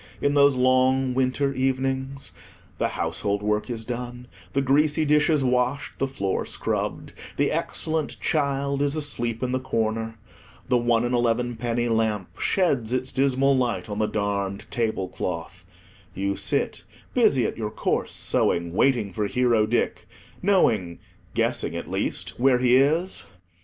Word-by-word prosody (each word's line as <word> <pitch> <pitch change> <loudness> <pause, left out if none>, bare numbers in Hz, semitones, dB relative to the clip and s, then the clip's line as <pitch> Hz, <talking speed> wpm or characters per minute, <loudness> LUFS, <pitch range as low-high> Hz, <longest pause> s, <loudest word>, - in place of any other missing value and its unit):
In 145 - +1
those 140 -1 +5
long 130 +1 +3
winter 130 +2 +1
evenings? 135 +1 -2 0.5
the - - +2
household 100 0 -1
work 105 +3 0
is 115 -2 -4
done—the 125 +2 -5
greasy 150 +3 +3
dishes 150 0 +3
washed, 125 +2 0
the 135 - +1
floor 100 -8 -2
scrubbed; - - -3 0.2
the - - +2
excellent 155 -2 -2
child 140 -2 0
is 145 +1 +1
asleep 120 -6 -2
in 125 - -1
the 130 - 0
corner; 115 -2 -2 0.5
the 125 - +2
one 120 0 +2
and 120 - -1
elevenpenny 120 0 0
lamp 110 -4 -1
sheds 135 - +1
its 130 +1 -1
dismal 135 0 +2
light 125 -3 -1
on 105 0 -4
the 105 - +2
darned 100 -2 -2
table 110 -5 -1
cloth; 85 -2 -5 0.5
you 100 +1 -1
sit, - - -1 0.3
busy - - +3
at - - -2
your - - -3
coarse - - -1
sewing, 85 0 0
waiting 110 -3 +2
for 105 +2 -1
Hero 115 -1 +2
Dick, 120 +2 -1 0.3
knowing—guessing, 110 - 0
at - - -6
least, - - -2
where 130 0 +4
he 125 0 +4
is—! 155 - +2
125 Hz, 140 wpm, -25 LUFS, 110-135 Hz, 0.5 s, those